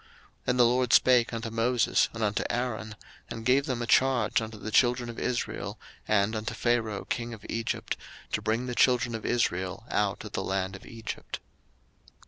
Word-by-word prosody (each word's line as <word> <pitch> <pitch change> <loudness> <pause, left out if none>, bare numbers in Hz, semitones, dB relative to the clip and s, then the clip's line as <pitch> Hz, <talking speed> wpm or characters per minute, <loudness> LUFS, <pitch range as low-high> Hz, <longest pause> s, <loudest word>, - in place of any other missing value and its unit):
02:006:013 - - -26 0.4
And 125 0 +1
the 120 - +8
LORD 125 0 +2
spake 125 -2 +5
unto 115 -1 -4
Moses 115 +2 +2
and 115 -1 -4
unto 105 -1 +1
Aaron, 110 -3 -2 0.3
and 115 -1 -6
gave 135 +4 +3
them 125 -3 -1
a - - -2
charge 120 -3 +3
unto 110 0 -6
the 110 +1 -6
children 120 0 +3
of 115 - -9
Israel, 125 - -3 0.3
and 105 +1 +2
unto 110 +1 -3
Pharaoh 115 -3 0
king 120 -1 -3
of 100 - -16
Egypt, 115 0 -2 0.4
to - - 0
bring 115 +3 0
the 125 - -3
children 120 -1 +3
of 110 - -4
Israel 95 -6 0
out - - 0
of - - -8
the - - -2
land 95 0 -1
of 95 - -12
Egypt. 115 -1 -6
115 Hz, 185 wpm, -28 LUFS, 110-125 Hz, 0.4 s, the